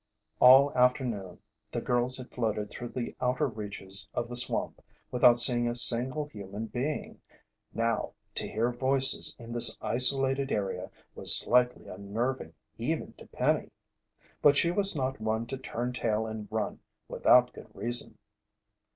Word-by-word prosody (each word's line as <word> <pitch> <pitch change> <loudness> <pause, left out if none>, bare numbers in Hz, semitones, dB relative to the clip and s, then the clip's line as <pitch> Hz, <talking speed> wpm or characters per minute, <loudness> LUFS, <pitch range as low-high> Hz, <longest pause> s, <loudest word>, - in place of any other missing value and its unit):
All 135 +3 +6
afternoon 125 -7 -1 0.3
the 120 - -4
girls 125 +1 0
had 130 -1 -10
floated 110 -3 -4
through 120 - -7
the 120 0 -7
outer 130 +4 -1
reaches 105 -5 -3
of 120 0 -4
the 120 - -7
swamp 120 - +4 0.3
without 120 -1 +4
seeing 120 0 +6
a 120 - -3
single 125 +5 +3
human 105 -4 -9
being. 130 +6 -6 0.5
Now 115 0 -3 0.2
to - - -4
hear 115 +3 -2
voices 130 +2 +2
in 115 0 -11
this 120 - +5
isolated 135 +4 +1
area 95 -3 -4 0.2
was - - +6
slightly 125 0 0
unnerving 100 -1 -5 0.2
even - - -4
to - - -13
Penny. - - -2 0.7
But 145 -1 +4
she 170 - +2
was 195 0 +2
not 135 -1 -4
one 110 +1 -3
to 135 - -6
turn 125 -1 -6
tail 110 -3 -2
and 110 -1 -8
run 110 0 -4 0.3
without - - +2
good - - -13
reason. 120 +1 +1
120 Hz, 145 wpm, -27 LUFS, 110-130 Hz, 0.7 s, All